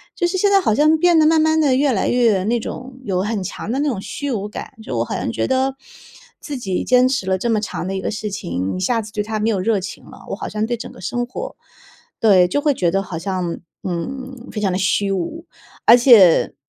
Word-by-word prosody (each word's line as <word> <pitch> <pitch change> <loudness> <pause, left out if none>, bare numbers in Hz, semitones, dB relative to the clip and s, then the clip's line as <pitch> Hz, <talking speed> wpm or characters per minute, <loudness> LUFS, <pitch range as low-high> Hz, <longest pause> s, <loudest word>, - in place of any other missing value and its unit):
就 355 -1 0
是 370 +2 0
现 405 +2 +3
在 395 -1 +4
好 220 - +2
像 305 +5 +4
变 345 -1 +4
得 310 - +5
慢 320 -1 +4
慢 315 0 +3
地 275 -4 +3
越 275 0 +2
来 200 - 0
越 225 -6 +2
那 235 +2 +1
种 255 +2 -8
有 185 -4 -1
很 210 -2 -2
强 200 - -6
的 270 - -1
那 295 0 +1
种 215 -7 -3
虚 275 +7 -5
无 205 -3 -2
感。 210 - -8
就 130 - -5
我 - - +2
好 - - -4
像 - - -2
觉 - - -1
得， 265 +1 +1 0.6
自 285 -3 -6
己 190 -6 -3
坚 255 +1 +4
持 245 -8 -1
了 190 0 +1
这 235 +5 -2
么 220 -2 +2
长 210 - -4
的 - - -3
一 - - -2
个 - - -3
事 210 -1 -4
情， 90 - -3
一 - - -4
下 230 +4 +1
子 210 0 -10
对 210 - -2
它 215 +1 -3
没 225 - +1
有 200 -4 0
热 205 0 +1
情 200 - -8
了， - - -14
我 - - -2
好 - - -5
像 215 0 -2
对 240 0 -2
整 - - -7
个 - - -14
生 245 0 -2
活 475 - -7 0.6
对， 190 -5 +5
就 290 +10 -1
会 290 -1 +2
觉 175 -8 0
得 195 +2 0
好 175 -3 -6
像， 180 -2 -3 0.2
嗯， 255 +8 -5
非 210 - -3
常 195 -3 +1
地 180 - -1
虚 195 +1 +1
无。 195 - -3 0.4
而 235 - +8
且， 225 -9 +6
225 Hz, 275 characters per minute, -20 LUFS, 195-265 Hz, 0.6 s, 而